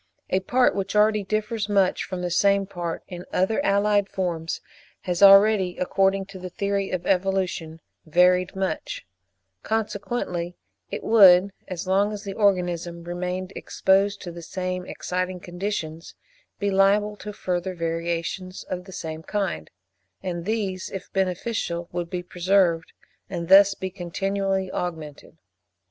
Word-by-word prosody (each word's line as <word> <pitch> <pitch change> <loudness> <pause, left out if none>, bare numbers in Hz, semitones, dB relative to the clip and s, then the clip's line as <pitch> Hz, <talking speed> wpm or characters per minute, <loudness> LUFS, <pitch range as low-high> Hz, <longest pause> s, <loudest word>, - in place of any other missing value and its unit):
A 185 - +3
part 245 +6 +2
which 195 +1 -3
already 210 0 +4
differs 215 +1 -2
much 195 -2 +2
from 185 -1 -5
the 175 - -2
same 200 +2 +3
part 175 -3 -5
in 180 -1 -7
other 220 +9 +1
allied 200 0 +2
forms 170 -3 -2 0.4
has 180 0 -2
already, 195 -2 +7
according 195 +1 +1
to 190 0 -11
the 185 0 -6
theory 200 +1 -1
of 180 -1 -3
evolution, 185 -4 0 0.3
varied 180 +3 +3
much; 195 - -3 0.6
consequently 205 -5 -2 0.3
it - - -5
would 195 -3 +7 0.2
(as 185 -2 -5
long 195 +3 +2
as 210 -1 -6
the 200 -2 -5
organism 175 -4 0
remained 180 +2 -4
exposed 200 +1 +1
to 175 - -6
the 170 0 -9
same 185 +1 -4
exciting 185 0 -3
conditions) 175 -3 -5 0.4
be 200 0 -1
liable 200 +2 +3
to 210 - -7
further 185 -2 -3
variations 170 +2 -3
of 180 0 -5
the 190 - -11
same 160 -4 -6
kind; 175 - -3 0.5
and 175 -2 -4
these, 200 -4 -2
if 195 - -8
beneficial, 185 -2 -1
would 175 -1 -3
be 180 -1 -4
preserved, 175 -2 +1 0.4
and 170 0 -4
thus 195 +1 +8
be 190 0 -5
continually 195 +1 -2
augmented. 160 -5 -6
185 Hz, 140 wpm, -24 LUFS, 175-200 Hz, 0.6 s, thus